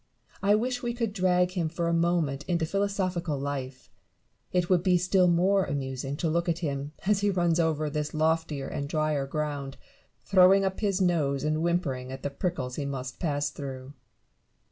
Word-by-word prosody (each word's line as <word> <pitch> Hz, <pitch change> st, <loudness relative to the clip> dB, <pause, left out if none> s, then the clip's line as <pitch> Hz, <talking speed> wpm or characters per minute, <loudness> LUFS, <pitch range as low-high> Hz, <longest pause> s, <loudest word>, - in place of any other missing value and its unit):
I 205 Hz, +1 st, +4 dB
wish 245 Hz, +3 st, -1 dB
we 240 Hz, -1 st, -2 dB
could 230 Hz, -4 st, -2 dB
drag 180 Hz, -2 st, +2 dB
him 175 Hz, -4 st, -1 dB
for 170 Hz, +1 st, -2 dB
a 170 Hz, -, +1 dB
moment 165 Hz, -5 st, +1 dB
into 170 Hz, -2 st, +1 dB
philosophical 185 Hz, -4 st, -1 dB
life: 135 Hz, -2 st, -5 dB, 0.6 s
it 180 Hz, -1 st, +1 dB
would 180 Hz, -2 st, +3 dB
be 180 Hz, 0 st, +3 dB
still 180 Hz, +1 st, +3 dB
more 185 Hz, +3 st, +3 dB
amusing 135 Hz, -2 st, -3 dB
to 165 Hz, -, -1 dB
look 170 Hz, +2 st, 0 dB
at 165 Hz, -, +1 dB
him, 140 Hz, 0 st, -3 dB
as 205 Hz, 0 st, +3 dB
he 205 Hz, -, +2 dB
runs 175 Hz, -3 st, +1 dB
over 155 Hz, -2 st, +1 dB
this 150 Hz, 0 st, -2 dB
loftier 160 Hz, -2 st, 0 dB
and 140 Hz, 0 st, -4 dB
dryer 155 Hz, -3 st, 0 dB
ground, 145 Hz, -2 st, -3 dB, 0.5 s
throwing 195 Hz, 0 st, +6 dB
up 190 Hz, 0 st, -2 dB
his 200 Hz, -3 st, 0 dB
nose 150 Hz, -7 st, +1 dB
and 155 Hz, +1 st, 0 dB
whimpering 140 Hz, -7 st, -1 dB
at 130 Hz, 0 st, -8 dB
the 145 Hz, -, -2 dB
prickles 135 Hz, -5 st, -3 dB
he 145 Hz, -, -2 dB
must 130 Hz, -2 st, -5 dB
pass 145 Hz, -4 st, -1 dB
through. 135 Hz, -1 st, -7 dB
165 Hz, 180 wpm, -28 LUFS, 140-180 Hz, 0.6 s, throwing